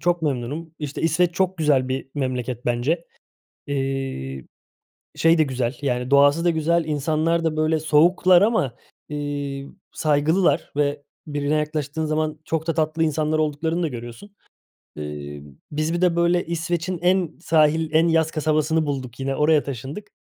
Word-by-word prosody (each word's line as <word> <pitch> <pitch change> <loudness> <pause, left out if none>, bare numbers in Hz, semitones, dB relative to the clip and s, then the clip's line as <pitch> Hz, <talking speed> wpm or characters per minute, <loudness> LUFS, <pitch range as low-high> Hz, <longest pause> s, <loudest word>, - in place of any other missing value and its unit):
çok 175 -1 +1
memnunum. 150 +3 -3
İşte, 150 -2 -5
İsveç 165 +2 +2
çok 185 0 0
güzel 145 -5 +2
bir 130 +1 -3
memleket 125 -3 -3
bence. 130 +8 0 0.6
İii, 135 - -3 0.7
şey 165 +1 +4
de - - +6
güzel, 130 -3 -2
yani 125 -2 -1
doğası 145 +4 +5
da 175 - +4
güzel, 165 +1 +1
insanlar 155 +2 0
da, 160 -1 0
böyle, 155 +1 +2
soğuklar 175 +4 +4
ama, 205 - +1 0.3
iii, 145 -2 -4 0.2
saygılılar 155 +2 +1
ve 145 0 0 0.2
birine 145 0 -1
yaklaştığın 150 0 -2
zaman 155 0 -1
çok 160 0 -2
da 165 - 0
tatlı 160 0 0
insanlar 155 0 0
olduklarını 155 +3 0
da 165 - +1
görüyorsun. 120 - -9 0.7
İii, 75 -1 -7 0.3
biz 155 +2 -1
bir 175 - -1
de, 180 -2 +3
böyle, 170 +1 +2
İsveç'in 170 +2 -2
en 180 -2 +2
sahil, 160 -1 +3
en 160 +2 +4
yaz 160 -1 +2
kasabasını 155 +1 +1
bulduk 130 -4 -4
yine, 135 0 -1
oraya 150 0 +3
taşındık. 140 - -7
155 Hz, 150 wpm, -23 LUFS, 140-165 Hz, 0.7 s, de